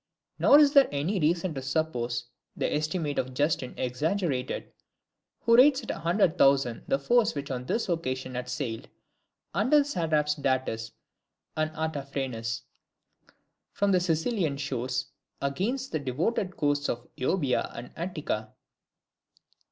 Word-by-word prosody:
Nor 285 - +7
is 295 -1 +6
there 280 -2 +7
any 155 +8 -1
reason 170 +2 +1
to 135 - -4
suppose 125 -4 -1 0.3
the - - 0
estimate 155 0 -1
of 130 0 -3
Justin 145 -2 0
exaggerated, 135 +1 -1 0.7
who 230 0 +4
rates 265 +3 +6
at - - -3
a - - -5
hundred 170 +1 +2
thousand 135 -4 +3
the 270 - +2
force 240 - +2
which 140 -1 -4
on 125 -1 -3
this 230 - 0
occasion 130 -7 -2
had 125 0 -4
sailed, 120 -7 -4 0.6
under 220 - +4
the 290 - +4
satraps 155 - +1
Datis 130 -6 -1 0.6
and 155 0 0
Artaphernes, 135 -7 -3 1.1
from 200 0 +1
the 185 - +4
Cilician 165 - 0
shores, 130 -2 -2 0.3
against 215 - -2
the 155 - -1
devoted 175 - -1
coasts 145 0 +1
of 120 0 -3
Euboea 130 -1 0
and 120 +1 -8
Attica. 150 - -3
150 Hz, 135 wpm, -28 LUFS, 130-185 Hz, 1.1 s, Nor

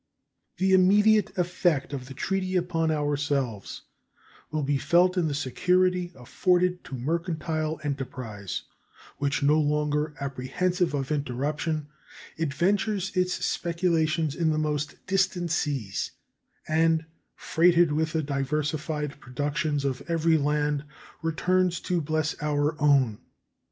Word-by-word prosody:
The 190 0 +2
immediate 205 +3 +4
effect 175 -5 0
of 130 -2 -5
the 135 - -9
treaty 190 +2 -1
upon 170 -2 +1
ourselves 145 -7 -1 0.7
will 155 -1 -2
be 140 0 +1
felt 175 +7 +3
in 175 -3 +1
the 145 - -2
security 180 +6 +1
afforded 180 +7 +1
to 135 - -6
mercantile 155 +2 -2
enterprise, 125 -8 -4 0.6
which, 140 0 0
no 150 +2 +4
longer 150 0 0
apprehensive 145 +6 -1
of 135 0 -3
interruption, 145 +2 -2 0.5
adventures 190 +6 0
its 180 0 0
speculations 165 -3 0
in 165 0 +1
the 155 - +1
most 150 -1 -2
distant 185 -3 0
seas, 135 - -1 0.6
and, 160 0 +2 0.3
freighted 170 -1 +3
with 155 +2 0
the 160 -1 0
diversified 150 +1 -2
productions 145 +3 -2
of 130 -2 -1
every 165 -1 +2
land, 150 -1 +1 0.4
returns 175 +2 +1
to 175 -2 0
bless 155 0 0
our 150 +1 +1
own. 135 -7 +3
155 Hz, 115 wpm, -27 LUFS, 145-175 Hz, 0.7 s, immediate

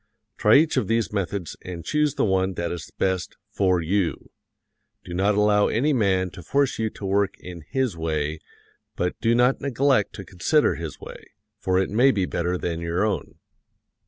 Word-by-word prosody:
Try 105 - +4
each 155 0 +4
of 130 - +1
these 115 -1 0
methods 100 -3 -3
and 85 -3 -7
choose 150 -2 +1
the - - +1
one 95 -1 +1
that 85 0 -2
is 85 -4 -6
best 95 -2 -1
for 95 -4 +2
you. 90 +2 -1 0.7
Do 90 - -7
not 100 +3 +2
allow 105 0 +4
any 145 +7 +1
man 95 -6 +1
to 90 - -10
force 140 +6 0
you 110 -1 0
to 105 - -9
work 100 0 +1
in 90 -3 -9
his 130 -7 0
way; 80 -1 -2 0.6
but 90 0 -1
do 115 +1 +3
not 125 +2 +3
neglect 135 -4 +1
to 100 - -8
consider 95 - +2
his 80 -3 -7
way, - - -10 0.4
for 95 0 0
it 95 +1 0
may 120 +6 +5
be 100 -8 +1
better 90 +1 -1
than 85 -2 -3
your 85 +4 0
own. 95 -9 -3
95 Hz, 185 wpm, -24 LUFS, 90-115 Hz, 0.7 s, may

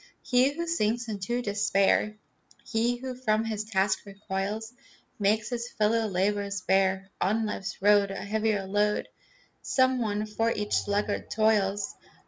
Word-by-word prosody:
He 255 +1 +4
who 340 +1 -2
sinks 240 -8 0
into 220 +4 -2
despair, 205 0 +2 0.5
He 235 +1 +1
who 260 +1 -5
from 225 -3 0
his 215 -1 -3
task 195 -2 +1
recoils, 200 +3 -4 0.5
Makes 210 +2 +1
his 240 -1 -3
fellow 225 -1 +2
laborers 200 +1 -1
bear 190 0 +1
On 220 +4 +1
life's 195 -3 -4
road 205 -1 +5
A 195 - -5
heavier 215 -1 0
load. 205 +2 +1 0.5
Some 260 -1 +2
one 210 -1 -1
for 225 +2 0
each 210 -2 -2
sluggard 205 0 0
toils. 205 -2 +1
210 Hz, 135 wpm, -28 LUFS, 200-225 Hz, 0.5 s, road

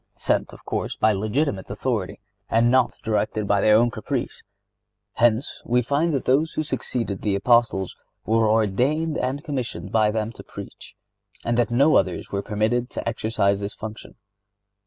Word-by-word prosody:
(74) - - -29
Sent, - - 0
of - - -15
course, - - -2
by 110 - +3
legitimate 110 +2 -1
authority, 105 -2 -2 0.3
and 115 +1 +3
not 130 -1 +3
directed 105 -1 -1
by 100 0 +3
their 105 0 +5
own 120 +2 +4
caprice. 120 +3 -4 0.7
Hence, 120 +2 +1
we 125 +1 +1
find 145 +7 +1
that 135 - -2
those 150 +5 +2
who 155 - -1
succeeded 115 -8 -3
the 100 -2 0
Apostles 110 -3 +2 0.3
were 110 0 +3
ordained 125 +10 +1
and 135 +3 -2
commissioned 135 -7 -4
by 110 -1 +3
them 110 +1 -2
to - - -12
preach, - - -10 0.5
and 120 - +1
that 120 - +2
no 140 +6 +4
others 90 - -1
were 100 - -1
permitted 115 +4 0
to - - -5
exercise 110 -3 0
this 100 +1 -5
function. 110 0 -8
115 Hz, 165 wpm, -23 LUFS, 105-130 Hz, 0.7 s, their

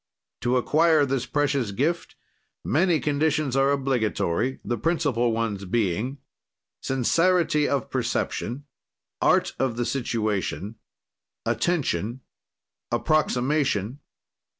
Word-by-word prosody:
"To 125 +1 +1
acquire 155 +3 +3
this 135 -2 -2
precious 140 -5 0
gift, 145 - -1 0.5
many 165 +3 +2
conditions 145 -2 0
are 135 0 +3
obligatory, 125 -5 0
the 120 -2 -2
principle 130 -5 +1
ones 110 -3 -2
being: 110 +6 -1 0.6
"Sincerity 150 +4 +2
of 140 -4 -1
perception. 130 +6 -2 0.6
"Art - - +3
of 130 -3 0
the 120 - 0
situation. 110 -4 -2 0.7
"Attention. 120 - -1 0.7
"Approximation. 135 - +1
130 Hz, 90 wpm, -25 LUFS, 115-145 Hz, 0.7 s, acquire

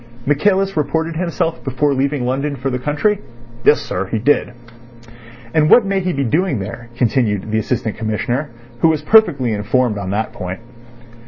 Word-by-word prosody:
"Michaelis 195 +7 +2
reported 160 +2 -1
himself 170 -1 -2
before 140 +2 0
leaving 135 -1 0
London 140 +3 -1
for 135 +1 -3
the 125 - -2
country?" 150 - 0 0.4
"Yes, 150 - +5
sir. 95 +1 -3
He 110 - -2
did." 130 +3 +2 1.0
"And 155 -1 +3
what 240 - +7
may 195 0 0
he 185 -1 -1
be 140 -4 -1
doing 155 +3 +1
there?" 105 +4 -7
continued 110 -4 0
the 110 - +2
Assistant 110 -1 -2
Commissioner, 120 +6 -2 0.3
who 165 - +4
was 155 -2 +1
perfectly 150 - +4
informed 110 +1 0
on 95 -2 -4
that 105 +3 -2
point. 90 +4 -6
135 Hz, 165 wpm, -18 LUFS, 115-160 Hz, 1.0 s, what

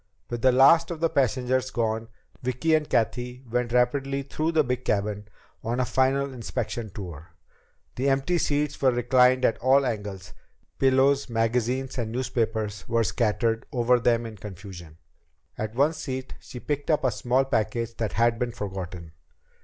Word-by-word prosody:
With 120 -1 -3
the 130 - +5
last 135 +6 +6
of 170 -3 -5
the 165 0 +1
passengers 130 -2 +1
gone, 115 -1 -1 0.3
Vicki 130 +6 0
and 155 -1 +2
Cathy 125 +2 -1
went 120 0 -1
rapidly 135 +3 +1
through 155 +4 -2
the 155 -1 +4
big 125 -1 -2
cabin 105 0 -1 0.4
on 120 +3 -2
a 130 - +2
final 135 +2 +1
inspection 115 -2 -4
tour. 85 -4 -9 0.6
The 135 +3 +1
empty 135 +6 +1
seats 145 -1 -1
were 135 - +5
reclined 125 +1 +3
at 115 - +1
all 135 +2 +4
angles; 100 -5 -5 0.5
pillows, 135 +1 +3
magazines, 125 +3 -1
and 110 -2 -2
newspapers 110 -5 -2
were 115 0 +2
scattered 115 0 0
over 125 -2 +3
them 120 0 +2
in 110 -2 -8
confusion. 90 -5 -10 0.6
At 110 +1 -5
one 145 +5 +3
seat 130 -4 -5
she 125 - -10
picked 145 +2 -3
up 155 - +2
a 130 - +2
small 125 +4 +1
package 115 -1 -1
that 110 -3 -2
had 115 0 +2
been 125 -1 -2
forgotten. 90 -5 -6
125 Hz, 160 wpm, -26 LUFS, 110-135 Hz, 0.6 s, last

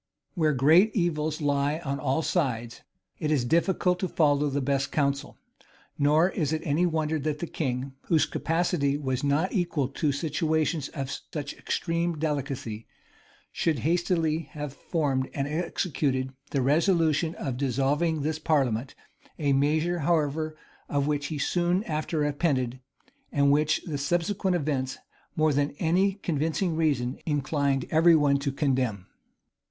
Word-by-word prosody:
Where 155 -2 +2
great 160 - +5
evils 155 -5 0
lie 145 +1 +1
on 140 0 -2
all 140 +3 0
sides, 120 -10 -1 0.4
it 155 - -1
is 145 -5 +2
difficult 180 +4 +2
to 185 - -1
follow 145 -3 +2
the 140 +1 -1
best 135 0 0
counsel; 140 -1 -1 0.6
nor 150 +5 +4
is 155 -5 -1
it 160 - -1
any 165 +4 +2
wonder 160 -1 0
that 150 +1 -2
the 170 - -3
king, 135 -4 -3
whose 160 -3 +3
capacity 160 -3 0
was 130 -3 -2
not 145 +6 +1
equal 170 - 0
to 145 +1 0
situations 155 0 0
of 135 -3 -5 0.2
such 150 -3 -4
extreme 170 0 -2
delicacy, 140 -7 -3 0.6
should 160 -3 0
hastily 165 -2 +1
have 150 -2 -5
formed 140 -4 -1
and 140 -1 -1
executed 145 -5 -1 0.2
the 135 -3 0
resolution 160 +2 +2
of 135 -3 -3
dissolving 140 +5 +1
this 155 +1 -1
parliament: 135 -6 0 0.4
a 145 -3 +1
measure, 155 +5 +1
however, 155 0 0 0.3
of 140 -1 +1
which 145 -1 -1
he 155 - -4
soon 175 +5 +1
after 155 -2 -3
repented, 140 -4 0 0.5
and 140 0 +3
which 150 +1 +2
the 150 -4 -3
subsequent 175 +5 0
events, 135 -5 -1 0.4
more 155 -1 +3
than 145 +1 0
any 185 +4 +2
convincing 165 -1 -1
reason, 140 -6 0
inclined 140 -2 0
every 165 +1 +6
one 145 -2 +3
to 140 0 -1
condemn. 130 - 0
150 Hz, 140 wpm, -27 LUFS, 140-165 Hz, 0.6 s, every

